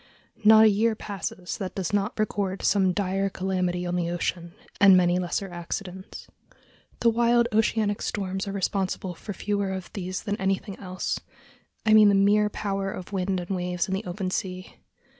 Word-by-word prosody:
Not 220 Hz, +1 st, +8 dB
a -, -, +8 dB
year 220 Hz, +2 st, +2 dB
passes 195 Hz, -3 st, -5 dB
that 190 Hz, -3 st, -5 dB
does 190 Hz, -1 st, -3 dB
not 205 Hz, +3 st, 0 dB
record 200 Hz, -3 st, -1 dB
some 190 Hz, -2 st, +3 dB
dire 195 Hz, +1 st, 0 dB
calamity 185 Hz, -2 st, -1 dB
on 175 Hz, 0 st, -2 dB
the 175 Hz, -1 st, -1 dB
ocean, 175 Hz, 0 st, -3 dB, 0.2 s
and 195 Hz, -2 st, +8 dB
many 180 Hz, 0 st, +3 dB
lesser 180 Hz, +2 st, -2 dB
accidents. 180 Hz, +2 st, -6 dB, 0.8 s
The 235 Hz, -, +5 dB
wild 235 Hz, +1 st, +3 dB
oceanic 215 Hz, -1 st, +1 dB
storms 190 Hz, 0 st, -3 dB
are -, -, -3 dB
responsible 190 Hz, -1 st, -2 dB
for 205 Hz, +4 st, -7 dB
fewer 200 Hz, 0 st, -1 dB
of 190 Hz, -1 st, -6 dB
these 185 Hz, -3 st, -4 dB
than 205 Hz, -1 st, -2 dB
anything 195 Hz, 0 st, -1 dB
else—I 185 Hz, +3 st, -4 dB
mean 215 Hz, -1 st, +8 dB
the 200 Hz, -, +4 dB
mere 205 Hz, +2 st, +4 dB
power 195 Hz, -2 st, -3 dB
of 185 Hz, +2 st, -8 dB
wind 190 Hz, 0 st, 0 dB
and 180 Hz, +2 st, -3 dB
waves 180 Hz, -1 st, -2 dB
in 190 Hz, -, -3 dB
the 195 Hz, +3 st, -2 dB
open 185 Hz, +1 st, -3 dB
sea. 185 Hz, -1 st, -4 dB
195 Hz, 170 wpm, -26 LUFS, 185-205 Hz, 0.8 s, Not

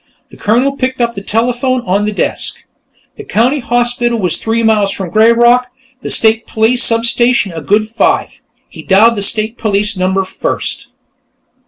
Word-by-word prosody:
The -, -, -15 dB
Colonel 240 Hz, +6 st, +1 dB
picked 260 Hz, -1 st, -2 dB
up 235 Hz, -1 st, 0 dB
the 195 Hz, -, -7 dB
telephone 245 Hz, +4 st, -1 dB
on 200 Hz, -1 st, -1 dB
the 210 Hz, -, -1 dB
desk. 205 Hz, -, -2 dB, 0.6 s
The 430 Hz, -, -8 dB
County 250 Hz, -, 0 dB
Hospital 240 Hz, 0 st, 0 dB
was 185 Hz, -5 st, 0 dB
three 225 Hz, +1 st, -2 dB
miles 210 Hz, -3 st, +2 dB
from 190 Hz, -4 st, -6 dB
"Greyrock"; 235 Hz, +4 st, +4 dB, 0.3 s
the -, -, -6 dB
State 220 Hz, 0 st, +2 dB
Police 230 Hz, +3 st, +1 dB
substation 235 Hz, -2 st, +2 dB
a 165 Hz, -1 st, -7 dB
good 210 Hz, +8 st, 0 dB
five. 230 Hz, +1 st, -1 dB, 0.3 s
He -, -, -12 dB
dialed 215 Hz, +4 st, +3 dB
the 205 Hz, -, -3 dB
State 215 Hz, +3 st, 0 dB
Police 210 Hz, -1 st, -1 dB
number 190 Hz, +1 st, -1 dB
first. -, -, -4 dB
225 Hz, 160 wpm, -13 LUFS, 205-240 Hz, 0.6 s, Greyrock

